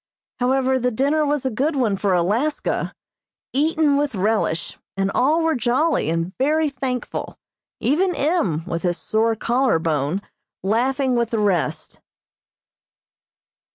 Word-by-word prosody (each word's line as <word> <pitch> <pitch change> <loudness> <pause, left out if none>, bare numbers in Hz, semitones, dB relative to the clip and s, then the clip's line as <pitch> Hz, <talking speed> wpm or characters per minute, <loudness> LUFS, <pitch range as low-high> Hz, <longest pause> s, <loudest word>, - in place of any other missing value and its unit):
However, 260 +1 +2
the 250 0 +1
dinner 280 +6 +1
was 290 -2 -1
a 260 - 0
good 280 +8 0
one 235 -7 +1
for 195 0 0
Alaska, 220 - 0 0.6
eaten 300 +1 +2
with 285 -4 -1
relish, 200 -4 -1 0.2
and 195 0 0
all 310 +6 +2
were 325 0 +2
jolly 250 - +1
and 165 +3 -2
very 305 +2 +2
thankful, 255 -2 -4 0.4
even 355 +6 +1
M., 210 - 0
with 170 -2 -3
his 175 -1 0
sore 225 +1 +1
collar 245 -1 +1
bone, 160 +3 -1 0.4
laughing 255 +5 +1
with 235 -1 +1
the 230 - -1
rest. 200 -5 -1
250 Hz, 130 wpm, -22 LUFS, 200-285 Hz, 0.6 s, However